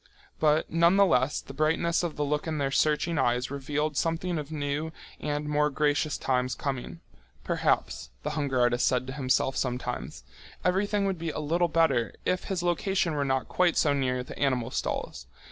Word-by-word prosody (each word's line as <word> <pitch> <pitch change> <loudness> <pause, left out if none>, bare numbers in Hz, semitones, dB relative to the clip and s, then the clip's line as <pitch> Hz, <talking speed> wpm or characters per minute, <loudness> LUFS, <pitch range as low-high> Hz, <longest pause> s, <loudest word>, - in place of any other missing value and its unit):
But 155 0 +2
nonetheless 170 -5 +4
the 135 - -11
brightness 160 +3 +1
of 170 -3 -3
the 150 - -1
look 150 +2 -1
in 155 -1 -2
their 140 -2 0
searching 155 +2 +1
eyes 125 0 +1
revealed 145 +2 -2
something 165 +3 -1
of 150 0 -7
new 150 +1 -2 0.3
and 150 0 -2
more 150 0 +2
gracious 145 +1 +1
times 125 -1 0
coming. 125 - -4 0.4
Perhaps, - - 0
the 150 - -2
hunger 140 -4 -1
artist 120 0 +3
said 125 0 +1
to 130 - -6
himself 135 -1 +1
sometimes, 125 -1 -3 0.4
everything 200 +2 +1
would 190 -3 -1
be 165 0 -3
a - - -5
little 170 +4 +1
better 140 -9 +2
if 180 0 0
his 185 -3 -2
location 175 0 +1
were 145 -1 0
not 130 -1 0
quite 180 -2 +2
so 145 - +3
near 125 -2 0
the - - -10
animal 130 -3 0
stalls. 60 - -3
150 Hz, 175 wpm, -28 LUFS, 130-165 Hz, 0.4 s, nonetheless